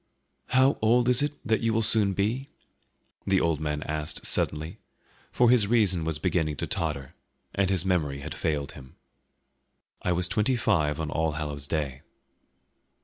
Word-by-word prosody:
"How 130 +2 +3
old 120 +2 +3
is 125 +1 +5
it 145 0 0
that 110 -2 +1
you 115 -1 +1
will 115 0 +1
soon 105 -2 +4
be?" 115 +8 -1 0.8
the 95 -1 +3
old 80 -4 0
man 75 -1 -3
asked 75 0 -4
suddenly, 75 +2 +1 0.5
for 120 -1 +4
his 115 -5 +4
reason 100 -7 +2
was 80 -2 -1
beginning 80 0 -1
to - - -3
totter, 70 -2 -3 0.4
and 100 -1 +1
his 95 -2 0
memory 75 -7 0
had 80 +1 -6
failed 75 -3 -2
him. 65 -1 -14 1.1
"I 90 - -1
was 90 +1 0
twenty 105 +7 +1
five 80 -10 +1
on 80 -2 -3
All 80 +1 0
Hallows' 75 -2 -4
Day." 70 -5 -3
85 Hz, 160 wpm, -27 LUFS, 75-110 Hz, 1.1 s, is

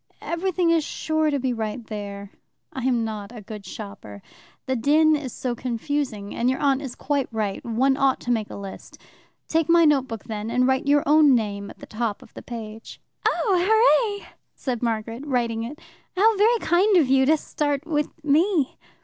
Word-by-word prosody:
"Everything 345 0 0
is 330 -2 +3
sure 315 +1 -1
to 285 - 0
be 260 -1 -1
there. 210 -3 -5 0.4
I 260 -2 -4
am 240 -3 +1
not 215 -1 -6
a 240 - -9
good 210 -1 -9
shopper. 195 - -9 0.4
The 260 - -1
din 305 +6 +4
is 280 -4 -4
so 250 +1 -3
confusing, 240 -3 -3
and 240 +2 +1
your 260 - 0
aunt 275 -1 +1
is 265 -4 -6
quite 280 -2 -1
right 215 -3 -2
one 255 +4 +2
ought 270 -1 +2
to 245 - -2
make 220 -3 0
a - - -8
list. 200 -1 -9 0.5
Take 325 0 +1
my 335 0 +6
notebook, 265 -7 +1
then, 215 -1 -5
and 250 +2 +2
write 265 +2 +1
your 290 0 +4
own 295 -2 +6
name 200 -3 -2
at - - -12
the - - -11
top 220 -2 -3
of - - -19
the - - -9
page." 225 -2 -8 0.3
"Oh, 375 -6 +2 0.5
hooray!" - - -13 0.3
said 250 -4 -3
Margaret, 230 +1 -2
writing 240 -5 -1
it. 265 +6 -7 0.4
"How 440 +3 +5
very 445 +4 +4
kind 380 +3 +3
of 310 -6 +4
you 265 0 +4
to 315 +1 +5
start 290 -1 -2
with 300 -2 0 0.2
me!" 310 0 +2
260 Hz, 185 wpm, -24 LUFS, 225-300 Hz, 0.5 s, my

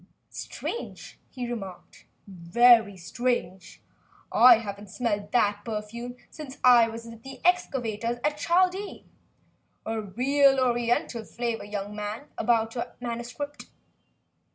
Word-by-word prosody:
"Strange," 470 - -7
he 250 -2 -5
remarked, 195 -7 -8 0.2
"very 205 +3 +4
strange. 190 -3 -3 0.5
I 245 -1 +8
haven't 205 -2 -7
smelt 205 -1 -2
that 205 -3 +2
perfume 230 +3 -5 0.2
since 295 -4 -9
I 240 -2 +7
was 230 0 -8
with 230 -1 -11
the 265 +1 -10
excavators 240 -10 0
at 295 0 +1
Chaldea. 370 +5 +1 0.8
A 225 0 -2
real 270 +7 +3
Oriental 240 -2 0
flavor, 235 -1 -4
young 205 0 -5
man, 210 +7 -5
about 225 -2 +1
your 235 - -5
manuscript." 245 +5 -6
235 Hz, 110 wpm, -27 LUFS, 210-255 Hz, 0.8 s, I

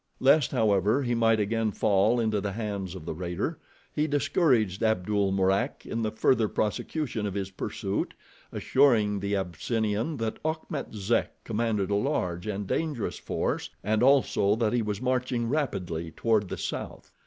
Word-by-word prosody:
Lest, 140 +2 +5
however, 110 +1 +2
he 120 -1 0
might 115 -1 +3
again 110 +1 +1
fall 105 +4 +2
into 110 -3 +1
the 100 -1 -3
hands 100 -4 -4
of 80 - -9
the - - -3
raider, 90 - -3 0.3
he 150 +1 +1
discouraged 130 - +2
Abdul 105 -2 +1
Mourak 95 0 +1
in 115 - -3
the 110 - 0
further 110 +1 +2
prosecution 110 +2 -2
of 100 - -5
his 95 -1 -3
pursuit, 95 - -3 0.4
assuring 110 -7 +3
the 100 +1 -1
Abyssinian 110 - -1
that 115 -2 -3
Achmet 155 -5 -3
Zek 105 +3 -1
commanded 110 -3 -1
a - - +3
large 100 - -1
and 105 -1 -3
dangerous 145 - -2
force, - - -2
and 110 +2 +1
also 125 -6 +4
that 115 -1 0
he 120 - +2
was 105 -2 -2
marching 125 -2 0
rapidly 90 - -2
toward 105 +1 +1
the - - -4
south. - - -5
110 Hz, 155 wpm, -28 LUFS, 100-120 Hz, 0.4 s, Lest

